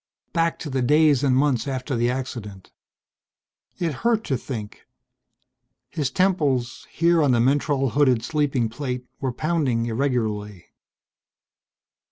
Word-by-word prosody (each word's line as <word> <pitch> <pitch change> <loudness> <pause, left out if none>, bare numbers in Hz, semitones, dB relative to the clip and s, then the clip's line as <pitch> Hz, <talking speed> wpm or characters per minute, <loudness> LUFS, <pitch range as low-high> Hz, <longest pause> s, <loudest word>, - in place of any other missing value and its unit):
Back 165 0 +1
to 150 - -5
the 130 0 0
days 150 +1 +4
and 130 -2 +3
months 135 -3 +1
after 130 0 -3
the 120 +1 +1
accident. 120 -7 -6 1.1
It 165 -3 -1
hurt 225 - 0
to 135 - -1
think. 110 -5 -7 1.0
His 150 -5 -1
temples, 145 -9 0
here 170 0 +2
on 140 -4 +3
the 120 - +3
mentrol 135 +1 +1
hooded 130 -5 +3
sleeping 140 -3 0
plate, 125 +1 -5
were 130 -2 -1
pounding 135 -5 0
irregularly.... 110 -6 -2
135 Hz, 125 wpm, -23 LUFS, 120-150 Hz, 1.1 s, days